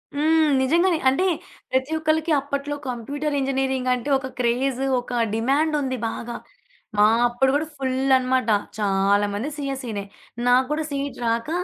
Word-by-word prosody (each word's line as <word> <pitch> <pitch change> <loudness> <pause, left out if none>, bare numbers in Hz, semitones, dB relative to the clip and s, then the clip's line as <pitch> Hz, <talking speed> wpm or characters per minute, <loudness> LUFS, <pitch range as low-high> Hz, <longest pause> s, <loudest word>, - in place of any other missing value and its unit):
హ్మ్. 315 +1 +3
నిజంగానే 335 +6 +3
అంటే 275 +8 +1 0.5
ప్రతి 260 +3 0
ఒక్కళ్లకి 315 +1 +1
అప్పట్లో 280 +1 -3
కంప్యూటర్ 285 +5 -3
ఇంజినీరింగ్ 265 -1 0
అంటే 250 +2 -3
ఒక 265 0 -6
క్రేజ్ 250 +2 0 0.2
ఒక 245 -1 -2
డిమాండుంది 275 +3 +1
బాగా. 235 +1 -6 0.6
మా 210 - +6 0.2
అప్పుడు 245 +2 +1
కూడా 300 +2 +1
ఫుల్ 265 0 0
అనమాట. 255 -2 0 0.3
చాలామంది 205 +3 +1
సీఎస్‌‌సినే 265 -7 -4 0.4
నా 245 - +5 0.2
కూడా 305 +1 -1
సీట్ 280 0 -4
రాక 230 +4 0
265 Hz, 130 wpm, -23 LUFS, 240-290 Hz, 0.6 s, మా